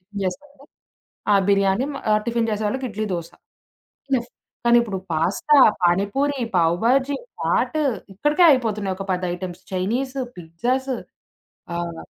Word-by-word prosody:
Tiffin 200 +2 -7
చేస్తుంటే. 280 +7 -6 0.7
ఆ - - +6
బిర్యానీ 200 +5 +3 0.3
ఆహ్, 210 - +3
టిఫిను 235 -1 0
చేసేవాళ్ళకి 215 +5 -1
ఇడ్లీ, 215 +1 -3
దోస. 170 -1 -5 0.8
ఇనఫ్ 245 -2 0 0.4
కానీ 240 0 +7
ఇప్పుడు 200 -5 -4
పాస్తా, 185 - +2 0.3
పానీపూరి, 205 +11 +1 0.2
పావ్ 170 0 +3
భాజీ, 270 +3 +3 0.2
చాటు 310 -2 +1 0.3
ఇక్కడికే 295 - +3
అయిపోతున్నాయి 215 -8 +1
ఒక 195 - -5
10 180 0 -1
ఐటెమ్స్ 180 -1 -7
చైనీసు, 250 +9 -1 0.2
పిజ్జాసు 245 +11 -2 0.8
ఆహ్ 170 -1 -4
215 Hz, 125 wpm, -22 LUFS, 185-265 Hz, 0.8 s, కానీ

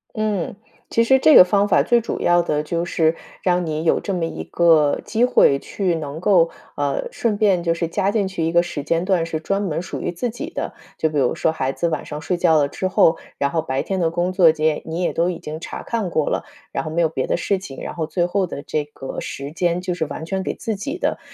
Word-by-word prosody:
嗯， 210 -5 -1 0.3
其 230 - +3
实 265 +3 +4
这 310 +3 +6
个 - - +11
方 200 +2 +2
法 200 - +4
最 240 -1 +3
主 230 - -4
要 175 0 +4
的， 150 -3 -1
就 170 +2 -2
是 160 -1 +1 0.3
让 180 -1 +2
你 155 0 -2
有 165 - +3
这 200 - -3
么 175 -3 -1
一 165 - -5
个 160 -4 +3
机 230 +2 0
会， 140 - +4
去 190 +2 -2
能 150 -1 -5
够 180 -3 +4 0.3
呃， 145 -1 -1
顺 220 -3 -1
便 195 -5 +3
就 165 -1 +1
是 170 0 -2
加 195 +3 0
进 205 -2 +1
去 185 -3 -3
一 165 - 0
个 170 +1 +4
时 175 -5 -5
间 165 +3 0
段， 185 -4 +2
是 160 -1 -3
专 195 +5 -1
门 170 -5 -2
属 180 - -6
于 - - -2
自 210 +8 -3
己 305 +8 -6
的， - - -4 0.2
就 160 - +1
比 150 - -3
如 125 -3 +1
说 160 - +1
孩 135 -4 -1
子 170 - -1
晚 - - -2
上 150 - -6
睡 175 +4 -1
觉 165 -2 +4
了 145 -2 +3
之 185 +6 -3
后， 165 -2 +4 0.2
然 140 0 0
后 160 0 0
白 135 -1 -2
天 190 -1 -2
的 165 -2 +2
工 175 +2 -1
作 175 -4 +6
这 155 - -6
些， 155 -1 +2
你 165 +2 -4
也 180 - 0
都 170 +2 +1
已 180 - -3
经 155 +1 -7
查 - - -7
看 225 -6 -2
过 155 -3 0
了， - - -1 0.3
然 - - -2
后 - - -5
没 165 +2 0
有 160 - +3
别 130 -4 -2
的 - - +1
事 195 +1 0
情。 160 -8 -9
然 - - -5
后 160 -2 -3
最 175 +2 0
后 185 +1 0
的 140 - -7
这 150 -1 -2
个 135 -2 -7
时 140 +1 -6
间， 175 +2 0
就 180 0 -2
是 170 -2 -2
完 155 +2 -6
全 190 +3 -2
给 - - -3
自 225 -3 -3
己 275 - -4
的， - - -1
170 Hz, 285 characters per minute, -21 LUFS, 155-190 Hz, 0.3 s, 个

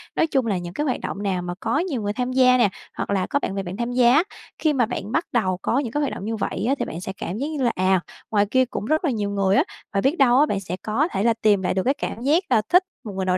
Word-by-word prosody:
nói 325 - +2
chung 270 -5 +1
là 205 -4 0
những 175 -1 -6
cái 295 +9 -2
hoạt 255 - -1
động 200 - -4
nào 190 -3 0
mà 175 0 -4
có 295 - 0
nhiều 320 -9 -2
người 205 0 -2
tham 250 +2 -2
gia 255 -1 +5
nè, 240 -5 +4 0.3
hoặc - - -3
là 195 -2 0
có 285 - +1
bạn 195 - -3
bè 195 - -2
bạn 185 +1 -6
tham 240 +1 -2
gia 245 -1 +5
á. 305 +5 +5 0.3
Khi 310 -2 +1
mà 250 -4 +2
bạn 215 -3 -5
bắt 325 +6 +1
đầu 190 -6 +1
có 250 - +1
những 250 -6 -3
cái 295 - -1
hoạt 285 - -1
động 195 - -6
như 225 +1 -2
vậy 210 - -3
á, 275 - +3
thì - - 0
bạn 165 - -6
sẽ 190 - -5
cảm 190 - -4
giác 280 - -2
như 305 -4 -3
là, 240 - +3
à, 185 0 +2 0.3
ngoài 205 -2 +3
kia 260 0 +4
cũng 240 - -5
rất 310 +8 +1
là 295 - +2
nhiều 210 -4 -2
người 195 -1 +1
á, - - +5 0.3
và 195 - +1
biết 280 - +1
đâu 255 -2 +5
á 295 - +6
bạn 205 -9 -1
sẽ 180 -2 -5
có 240 +9 0
thể 195 - -1
là 230 0 +4
tìm 205 -3 +4
lại 180 - 0
được 190 - 0
cái 270 - +2
cảm 235 - -5
giác 300 +8 +2
là 215 - +4
thích 360 +3 +5 0.2
một 210 - -7
người 190 0 -2
nào 185 0 +2
230 Hz, 330 wpm, -23 LUFS, 195-270 Hz, 0.3 s, á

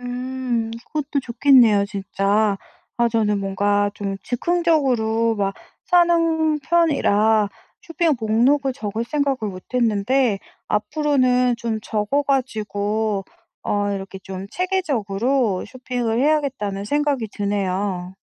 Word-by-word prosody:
음 250 -2 -3 0.2
그것도 295 -2 -2
좋겠네요 235 -4 +5
진짜. 200 0 0 0.4
아 235 - +4
저는 215 -2 +1
뭔가 205 +1 +1
좀 195 -2 -4
즉흥적으로 245 -7 +1
막 195 -1 -1 0.3
사는 330 -3 +3
편이라 225 -10 +2 0.3
쇼핑 330 -2 +1
목록을 255 +6 +2
적을 225 -3 -4
생각을 280 +1 0
못 185 -1 -9
했는데 235 -1 +2 0.3
앞으로는 250 0 +2
좀 230 -1 -3
적어 215 +7 -1
가지고 215 -5 -1 0.4
어 205 0 0
이렇게 195 -1 -6
좀 190 0 -7
체계적으로 255 - 0
쇼핑을 245 -3 -3
해야겠다는 265 -10 0
생각이 285 -1 0
드네요. 195 -2 -2
230 Hz, 245 characters per minute, -21 LUFS, 205-275 Hz, 0.4 s, 좋겠네요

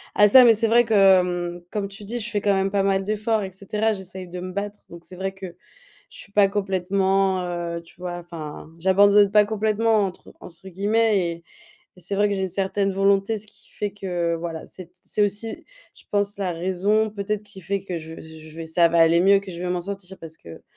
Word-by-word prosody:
à 210 - +6
ça. 255 +5 +8
Mais 230 -2 +7
c'est 225 +2 +1
vrai 235 +1 +4
que, 180 -4 +3
mmh, 175 - -16
comme 200 0 -3
tu 200 +2 -11
dis, 235 +4 -4
je 230 +1 -4
fais 205 -2 -1
quand 200 -1 +2
même 195 0 0
pas 200 - +1
mal 195 0 +1
d'efforts, 215 +1 -1
et 190 - -6
cetera. 210 +4 -1
J'essaye 190 -2 -8
de 180 +1 -7
me 185 +1 -6
battre. 205 +2 -5
Donc 170 0 -12
c'est 185 - -11
vrai 190 +1 -3
que 195 0 -10 0.7
je - - -14
suis 200 - -13
pas 200 -1 +5
complètement, 195 -1 0
heu, 175 -1 -4
tu 165 - -20
vois? 175 -1 -5
Enfin, 165 -3 -9
«j'abandonne 200 +3 +5
pas 210 0 +5
complètement», 220 0 +1
entre 185 - -10
entre 180 +2 -12
guillemets 210 +3 +1
et 170 0 -6 0.5
et - - -16
c'est 180 +3 -5
vrai 205 +1 +2
que 200 - -1
j'ai 190 - -2
une 190 - -1
certaine 195 +1 -1
volonté, 195 +2 +2
ce 210 +1 -13
qui - - -21
fait 205 - -3
que, 175 -4 -2
voilà, 165 -1 -6
c'est 185 - -10
t 175 - -35
c'est - - -4
aussi, 210 +2 -4 0.3
je - - -18
pense, 205 0 0
la 190 -3 -1
raison 190 +5 0
peut-être 205 0 -3
qui 200 -2 -13
fait 195 +2 -3
que 180 -3 -4
je 160 0 -9
vais, - - -11
z 160 0 -12
je 155 - -15
vais 165 0 -6
ça 170 +1 +4
va 170 0 +1
aller 165 +1 +5
mieux, 195 +2 +5
que 195 -1 -10
je 170 - -8
vais 180 - -3
m'en 180 0 -1
sortir. 195 0 -6
Parce 160 -1 -8
que, 80 - -13
195 Hz, 240 wpm, -23 LUFS, 175-205 Hz, 0.7 s, ça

